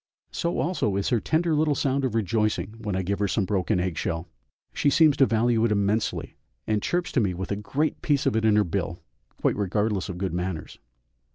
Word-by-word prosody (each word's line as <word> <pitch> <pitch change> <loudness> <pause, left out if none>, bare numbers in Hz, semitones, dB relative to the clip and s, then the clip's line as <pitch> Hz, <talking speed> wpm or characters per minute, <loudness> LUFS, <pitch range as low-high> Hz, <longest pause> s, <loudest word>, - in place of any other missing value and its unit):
So 170 -1 -2
also 140 - 0
is 100 0 0
her 120 - +2
tender 160 +7 +1
little 150 -1 +2
sound 135 0 0
of 125 -4 -1
rejoicing 110 -1 0
when 105 -4 -3
I 95 - -1
give 100 +2 -2
her 100 - +1
some 100 +1 0
broken 95 0 0
egg 90 -2 -2
shell; 80 +1 -3 0.5
she 145 - +2
seems 155 0 +5
to 135 - +5
value 115 0 +2
it 115 - +2
immensely, 105 +2 0 0.3
and 105 -1 0
chirps 175 - -1
to - - +2
me 95 -6 0
with 95 +2 -5
a - - +1
great 135 +9 -2
piece 145 -2 +1
of - - +2
it 110 - +1
in 110 -1 +4
her 105 - +5
bill, 85 -2 -3 0.4
quite - - +1
regardless 105 0 -1
of 90 - -5
good 95 -1 -2
manners. 90 -2 -4
105 Hz, 215 wpm, -25 LUFS, 95-130 Hz, 0.5 s, seems